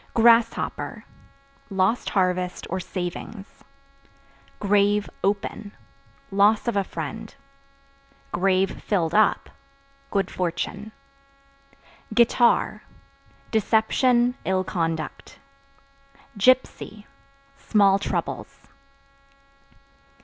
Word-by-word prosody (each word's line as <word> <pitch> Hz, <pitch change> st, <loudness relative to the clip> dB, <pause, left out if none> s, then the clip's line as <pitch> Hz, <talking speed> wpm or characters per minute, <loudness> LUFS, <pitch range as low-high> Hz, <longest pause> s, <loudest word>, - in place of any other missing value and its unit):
Grasshopper 230 Hz, 0 st, +2 dB, 0.6 s
Lost 195 Hz, +4 st, +1 dB
harvest 180 Hz, -2 st, 0 dB
or 185 Hz, -, -1 dB
savings. 185 Hz, +3 st, -7 dB, 1.0 s
Grave 205 Hz, 0 st, +2 dB, 0.2 s
(Open) 205 Hz, +1 st, -2 dB, 0.6 s
loss 205 Hz, +4 st, +3 dB
of 235 Hz, -, 0 dB
a 200 Hz, -, +2 dB
friend; 190 Hz, +6 st, -7 dB, 1.4 s
(filled 175 Hz, -5 st, -1 dB
up) 215 Hz, 0 st, +2 dB, 0.6 s
good 195 Hz, -2 st, -1 dB
fortune. 185 Hz, +4 st, -3 dB, 1.2 s
Guitar 240 Hz, 0 st, +3 dB, 0.7 s
Deception, 240 Hz, +3 st, +2 dB
ill 185 Hz, 0 st, 0 dB
conduct. 165 Hz, -4 st, -4 dB, 1.0 s
Gypsy 215 Hz, -2 st, +1 dB, 0.5 s
Small 200 Hz, -6 st, +3 dB
troubles. 200 Hz, -, -4 dB
205 Hz, 65 wpm, -24 LUFS, 185-220 Hz, 1.4 s, loss